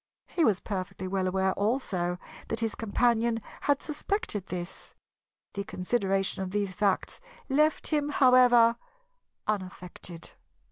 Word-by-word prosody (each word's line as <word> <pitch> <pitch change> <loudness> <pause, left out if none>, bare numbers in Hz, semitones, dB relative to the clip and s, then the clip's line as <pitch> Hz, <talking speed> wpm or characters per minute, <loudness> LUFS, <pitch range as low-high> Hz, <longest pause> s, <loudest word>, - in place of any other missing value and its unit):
He 335 - 0
was 205 -9 +3
perfectly 190 -1 -4
well 190 0 0
aware, 190 0 +1
also, 200 -6 0 0.3
that 225 - -2
his 225 -1 0
companion 230 +1 +1 0.3
had 285 -1 +3
suspected 300 - -2
this. 175 0 -6 0.6
The 200 - -3
consideration 195 -1 -1
of 190 - -3
these 200 -1 -1
facts 200 0 0 0.3
left 305 +3 +2
him, 295 -2 0
however, 250 -4 +6 0.7
unaffected. 185 -4 -5
205 Hz, 120 wpm, -29 LUFS, 190-245 Hz, 0.7 s, however